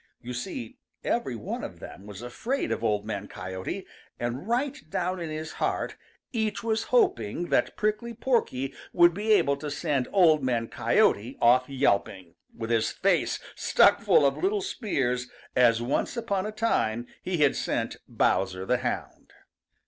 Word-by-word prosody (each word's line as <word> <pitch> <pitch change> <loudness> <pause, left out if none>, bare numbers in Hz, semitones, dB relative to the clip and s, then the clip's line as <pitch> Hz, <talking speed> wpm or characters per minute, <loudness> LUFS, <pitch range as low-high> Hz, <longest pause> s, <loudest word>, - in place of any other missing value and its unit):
You 125 0 -7
see, 120 -1 -6 0.2
every - - -1
one - - -5
of - - -7
them 100 +3 -10
was 105 +2 -9
afraid 235 - -2
of - - -2
Old 105 -1 +1
Man 105 -2 -4
Coyote, 95 -1 -5 0.3
and 120 - -3
right 260 +4 0
down 180 +3 -1
in 165 -2 -4
his 155 +1 -5
heart - - -1 0.4
each 220 -1 -1
was 225 -1 0
hoping 170 - +1
that - - +1
Prickly 215 +3 -1
Porky 175 - 0 0.2
would 175 -1 +6
be 210 +4 -1
able 140 -8 +3
to 150 +1 -5
send 145 -3 -1
Old 160 -7 +5
Man 120 -3 0
Coyote 115 +6 +2
off 125 +2 +4
yelping, 100 -9 0 0.2
with 115 0 -5
his 115 -1 +2
face - - +1 0.2
stuck - - +4
full 145 - +5
of 140 - +2
little 400 +2 +1
spears 135 - -1 0.3
as 120 -2 +4
once 140 - -1
upon 205 -4 -1
a - - -4
time 120 - 0 0.2
he 185 -1 -2
had 145 -3 +4
sent - - -2
Bowser 95 -1 +1
the - - +2
Hound. - - -5
140 Hz, 160 wpm, -27 LUFS, -, 0.4 s, would